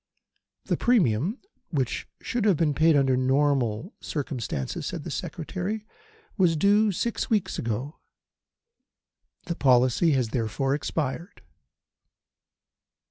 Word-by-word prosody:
"The - - 0
premium 185 - +2 0.3
which 135 -7 -2 0.2
should 240 -3 -1
have 195 -6 +4
been 155 -2 +2
paid 160 +2 +4
under 135 -2 +3
ordinary 130 - +1
circumstances," 125 - -4
said - - -5
the - - -6
Secretary, 190 +6 -4 0.5
"was 175 -3 +4
due 205 +5 +4
six 235 +7 -2
weeks 215 -5 0
ago. 120 +7 -3 1.5
The 170 - -2
policy 130 +3 +3
has 125 -4 +1
therefore 125 +4 -1
expired." 150 - -3
145 Hz, 105 wpm, -26 LUFS, 130-185 Hz, 1.5 s, have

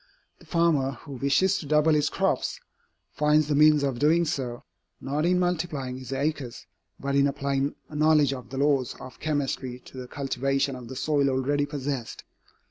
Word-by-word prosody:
The - - -19
farmer 160 -6 +2
who - - -10
wishes 140 +9 +2
to 150 - -8
double 150 +2 +4
his 150 -1 +2
crops, - - -1 0.5
finds 150 +3 +2
the 150 - 0
means 150 0 +5
of 135 -4 -1
doing 165 +4 +3
so, 130 -7 -3 0.4
not 145 +5 -1
in 180 0 +3
multiplying 160 -8 -1
his 130 0 -9
acres, 135 -2 -3 0.3
but 140 0 -2
in 140 0 +4
applying 140 0 -1
a 150 - -11
knowledge 150 -2 +4
of 125 -2 -8
the 135 - -6
laws 140 -3 +1
of 130 - -11
chemistry 135 -4 -2
to - - -12
the 125 - -7
cultivation 135 0 -1
of 125 -2 -9
the 130 - -8
soil 145 0 +1
already 140 +2 0
possessed. 140 -4 -4
140 Hz, 175 wpm, -26 LUFS, 135-150 Hz, 0.5 s, means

